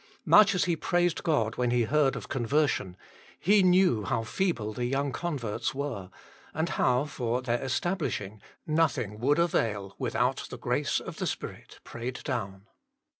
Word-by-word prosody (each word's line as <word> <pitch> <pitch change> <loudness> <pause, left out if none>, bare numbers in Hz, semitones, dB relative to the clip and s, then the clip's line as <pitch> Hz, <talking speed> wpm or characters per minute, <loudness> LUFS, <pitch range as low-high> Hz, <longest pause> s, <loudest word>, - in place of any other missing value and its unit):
Much 215 -1 +6
as 180 - +2
he 175 -2 +1
praised 175 +1 +1
God 120 -10 0
when 125 -1 +1
he 120 0 +2
heard 140 +2 +2
of - - -6
con 130 -3 -2
version, 120 -8 0 0.4
he 205 +3 +4
knew 180 - +4
how 110 +3 -1
feeble 115 - -1
the 120 +2 -2
young 135 +2 0
converts 130 -9 -3
were, 130 -10 -4 0.5
and 160 +2 0
how 125 +3 +2
for 125 -3 -2
their 120 -1 0
establishing 130 - -2 0.2
nothing 125 -10 0
would 140 +6 +2
avail 105 - 0
without - - 0
the - - -7
grace - - 0
of - - -8
the - - -2
Spirit - - -6
prayed 120 +2 -6
down. 100 -7 -4
130 Hz, 160 wpm, -28 LUFS, 115-160 Hz, 0.5 s, Much